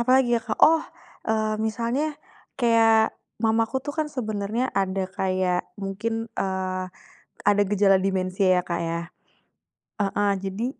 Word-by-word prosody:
apalagi 255 Hz, +1 st, +4 dB
ya -, -, -1 dB
Kak, 220 Hz, -, -3 dB
oh, 320 Hz, 0 st, +5 dB, 0.5 s
eee, 215 Hz, -1 st, +1 dB
misalnya 235 Hz, +6 st, -1 dB, 0.6 s
kayak 225 Hz, -1 st, +4 dB, 0.2 s
mamaku 225 Hz, +2 st, +1 dB
tuh 290 Hz, -, -3 dB
kan 310 Hz, -, +1 dB
sebenarnya 215 Hz, +1 st, -1 dB
ada 195 Hz, 0 st, 0 dB, 0.2 s
kayak 185 Hz, -1 st, +1 dB, 0.2 s
mungkin, 225 Hz, +4 st, -3 dB
eee, 185 Hz, -1 st, -2 dB, 0.6 s
ada 205 Hz, 0 st, +5 dB
gejala 200 Hz, -1 st, +4 dB
dimensia 190 Hz, 0 st, 0 dB
ya -, -, 0 dB
Kak 170 Hz, -, -2 dB
ya 165 Hz, -, -1 dB, 1.0 s
heeh, 205 Hz, 0 st, +1 dB
jadi 195 Hz, +4 st, -3 dB
210 Hz, 130 wpm, -25 LUFS, 190-230 Hz, 1.0 s, oh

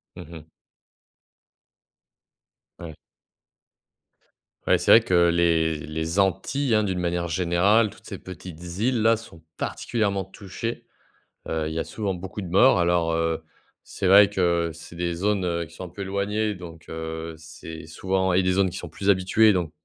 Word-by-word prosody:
Mmh 90 Hz, -, -10 dB
mh. 80 Hz, -1 st, -11 dB, 2.3 s
Ouais. 80 Hz, -2 st, -8 dB, 1.7 s
Ouais, -, -, +5 dB
c'est -, -, +2 dB
vrai -, -, +10 dB
que 85 Hz, -1 st, +3 dB
les 85 Hz, -2 st, +2 dB
les 80 Hz, +4 st, -3 dB
Antilles, 110 Hz, +7 st, +1 dB
hein, 110 Hz, -, +3 dB
d'une 95 Hz, -3 st, -2 dB
manière 85 Hz, 0 st, -1 dB
générale, 95 Hz, +7 st, +3 dB
toutes -, -, -18 dB
ces -, -, -7 dB
petites 90 Hz, -2 st, -10 dB, 0.2 s
îles 120 Hz, +1 st, +1 dB
là 115 Hz, +1 st, +5 dB
sont 110 Hz, -7 st, -12 dB, 0.2 s
particulièrement 100 Hz, -5 st, -2 dB
touchées. 100 Hz, +4 st, -6 dB, 0.6 s
Heu, 80 Hz, -1 st, -1 dB
il 80 Hz, -, -5 dB
y -, -, -2 dB
a -, -, -1 dB
souvent 100 Hz, -3 st, -3 dB
beaucoup 90 Hz, +3 st, -7 dB
de 95 Hz, -, -6 dB
morts 100 Hz, +9 st, +5 dB
alors, 85 Hz, -1 st, +2 dB
heu, 80 Hz, 0 st, -1 dB, 0.4 s
c'est -, -, -4 dB
vrai 100 Hz, +2 st, +7 dB
que 85 Hz, -2 st, +1 dB
c'est 85 Hz, +1 st, -12 dB
des 85 Hz, 0 st, -2 dB
zones, 100 Hz, +2 st, 0 dB
heu, 85 Hz, -1 st, -1 dB
qui 80 Hz, -, -17 dB
sont 95 Hz, -, -7 dB
un -, -, -8 dB
peu 100 Hz, +4 st, -7 dB
éloignées 105 Hz, +2 st, -1 dB
donc, 85 Hz, -3 st, -11 dB
heu, 80 Hz, 0 st, -5 dB
c'est 80 Hz, 0 st, -10 dB
souvent 95 Hz, +3 st, -1 dB
et 95 Hz, -, +4 dB
des 95 Hz, 0 st, +1 dB
zones 95 Hz, 0 st, +2 dB
qui 90 Hz, -, -6 dB
sont 85 Hz, -, -7 dB
plus 100 Hz, +5 st, 0 dB
habituées. 100 Hz, +3 st, +4 dB
Donc 90 Hz, -4 st, -1 dB
90 Hz, 170 wpm, -24 LUFS, 85-100 Hz, 2.3 s, vrai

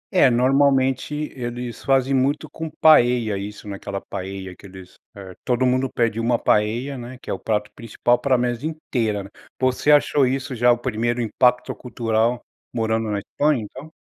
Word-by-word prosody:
É, 155 Hz, -, +6 dB
normalmente, 135 Hz, +3 st, +1 dB
eles 120 Hz, -1 st, -6 dB
fazem 135 Hz, 0 st, +2 dB
muito 135 Hz, +3 st, +1 dB
com 160 Hz, 0 st, -6 dB
paella 120 Hz, -9 st, +4 dB
isso, 105 Hz, +1 st, -7 dB
naquela 100 Hz, 0 st, -5 dB
paella 95 Hz, -1 st, -7 dB
que 100 Hz, -, -14 dB
eles, 95 Hz, -1 st, -13 dB, 0.2 s
eh, 95 Hz, -2 st, -10 dB
todo 125 Hz, +1 st, +1 dB
mundo 130 Hz, +1 st, +1 dB
pede 115 Hz, -2 st, 0 dB
uma 115 Hz, +1 st, +1 dB
paella, 120 Hz, +7 st, 0 dB
né, 120 Hz, +1 st, -9 dB
que -, -, -7 dB
é -, -, 0 dB
o 95 Hz, -, -5 dB
prato 105 Hz, -1 st, -2 dB
principal 120 Hz, +1 st, 0 dB
para 135 Hz, -2 st, +2 dB
a -, -, +2 dB
mesa 120 Hz, 0 st, -2 dB
inteira, 115 Hz, -10 st, -2 dB
né. 100 Hz, -, -11 dB, 0.3 s
Você 130 Hz, +3 st, +2 dB
achou 145 Hz, -2 st, +4 dB
isso 130 Hz, +1 st, -2 dB
já 120 Hz, +1 st, +4 dB
o 120 Hz, -, +2 dB
primeiro 120 Hz, 0 st, -2 dB
impacto 125 Hz, +2 st, +1 dB
cultural 115 Hz, -1 st, -1 dB, 0.3 s
morando 110 Hz, -1 st, 0 dB
na 100 Hz, -1 st, -2 dB
Espanha, 145 Hz, +3 st, 0 dB
então? 130 Hz, +9 st, -11 dB
120 Hz, 175 wpm, -22 LUFS, 110-130 Hz, 0.3 s, É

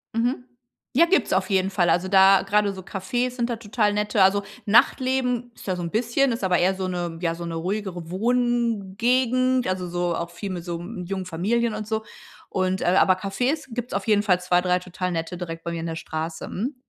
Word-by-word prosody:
Mhm. 245 Hz, +2 st, 0 dB, 0.5 s
Ja, 335 Hz, -, +7 dB
gibt's 375 Hz, +3 st, +2 dB
auf -, -, +1 dB
jeden 190 Hz, -1 st, +1 dB
Fall, 175 Hz, -3 st, +2 dB
also 180 Hz, +2 st, +2 dB
da 195 Hz, 0 st, +6 dB
grade 205 Hz, +1 st, +2 dB
so 190 Hz, -, -8 dB
Cafés 225 Hz, +7 st, -2 dB
sind 245 Hz, -1 st, -2 dB
da 235 Hz, -, -2 dB
total 210 Hz, -1 st, 0 dB
nette. 210 Hz, 0 st, +2 dB
Also 200 Hz, +2 st, +3 dB, 0.2 s
Nachtleben 250 Hz, +1 st, +2 dB
ist -, -, -14 dB
da 185 Hz, -, 0 dB
so 180 Hz, -, -5 dB
'n 170 Hz, -, -4 dB
bisschen 240 Hz, +4 st, +1 dB
ist 230 Hz, -, -3 dB
aber 180 Hz, -2 st, +3 dB
eher 185 Hz, +2 st, +3 dB
so 190 Hz, 0 st, -3 dB
'ne 175 Hz, -2 st, -3 dB
ja, 165 Hz, -2 st, 0 dB
so 170 Hz, -, -7 dB
'ne 165 Hz, -1 st, -4 dB
ruhigere 180 Hz, -1 st, -4 dB
Wohngegend, 240 Hz, +3 st, +1 dB
also 185 Hz, -1 st, -2 dB
so 175 Hz, -1 st, -1 dB
auch 170 Hz, +1 st, -3 dB
viel 195 Hz, +3 st, -6 dB
mit 175 Hz, -2 st, -5 dB
so, 170 Hz, -1 st, -4 dB
hm, 180 Hz, +1 st, -7 dB
jungen 190 Hz, +1 st, -4 dB
Familien 215 Hz, +7 st, 0 dB
und 215 Hz, 0 st, -4 dB
so 220 Hz, 0 st, -3 dB, 0.4 s
und 185 Hz, 0 st, 0 dB
äh, -, -, -1 dB
aber 185 Hz, +1 st, +4 dB
Cafés 245 Hz, +11 st, -1 dB
gibt's 245 Hz, +1 st, -4 dB
auf -, -, -2 dB
jeden 210 Hz, -2 st, +3 dB
Fall 185 Hz, -4 st, +3 dB
2, 180 Hz, 0 st, +2 dB
3 180 Hz, 0 st, +1 dB
total 180 Hz, 0 st, -4 dB
nette 165 Hz, +1 st, -3 dB
direkt 165 Hz, -2 st, -6 dB
bei 170 Hz, -, -2 dB
mir 165 Hz, -1 st, -4 dB
in -, -, -4 dB
der 165 Hz, 0 st, -4 dB
Straße. 160 Hz, 0 st, -5 dB
Mhm. 250 Hz, +9 st, -3 dB
195 Hz, 220 wpm, -24 LUFS, 180-235 Hz, 0.5 s, Ja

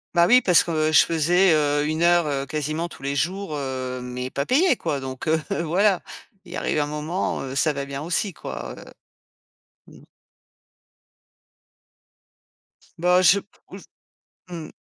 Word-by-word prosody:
Bah, 170 Hz, 0 st, +5 dB
oui, 250 Hz, +2 st, +6 dB
parce 180 Hz, -6 st, +4 dB
que 155 Hz, -2 st, 0 dB
je -, -, +7 dB
faisais, 170 Hz, +2 st, +3 dB
heu, 145 Hz, -1 st, +1 dB
1 155 Hz, +1 st, -2 dB
heure, 175 Hz, -1 st, +4 dB
heu, 140 Hz, -2 st, -2 dB
quasiment 155 Hz, +4 st, -3 dB
tous 135 Hz, -, -14 dB
les 140 Hz, +1 st, -2 dB
jours, 185 Hz, +4 st, -2 dB
heu, 130 Hz, -2 st, -4 dB
mais 125 Hz, +1 st, -6 dB
pas 140 Hz, -, -2 dB
payée, 310 Hz, +2 st, +3 dB
quoi. 140 Hz, -, -3 dB
Donc, 130 Hz, +2 st, -7 dB
heu, 160 Hz, +1 st, +2 dB, 0.2 s
voilà! 185 Hz, +3 st, +2 dB, 0.4 s
Il -, -, -9 dB
arrive 150 Hz, -, -1 dB
un 145 Hz, -, 0 dB
moment, 150 Hz, +4 st, -3 dB
heu, 135 Hz, 0 st, -6 dB
ça 150 Hz, +2 st, +1 dB
va 140 Hz, 0 st, -4 dB
bien 140 Hz, 0 st, -6 dB
aussi, 175 Hz, +4 st, -1 dB
quoi, -, -, -7 dB
heu. -, -, -12 dB, 1.0 s
Mmh. -, -, -17 dB, 2.9 s
Bah 180 Hz, +2 st, +3 dB
je 185 Hz, +3 st, +5 dB, 0.3 s
ou -, -, -9 dB
j -, -, -14 dB, 0.6 s
mmh. 165 Hz, -3 st, -7 dB
155 Hz, 160 wpm, -23 LUFS, 140-175 Hz, 2.9 s, je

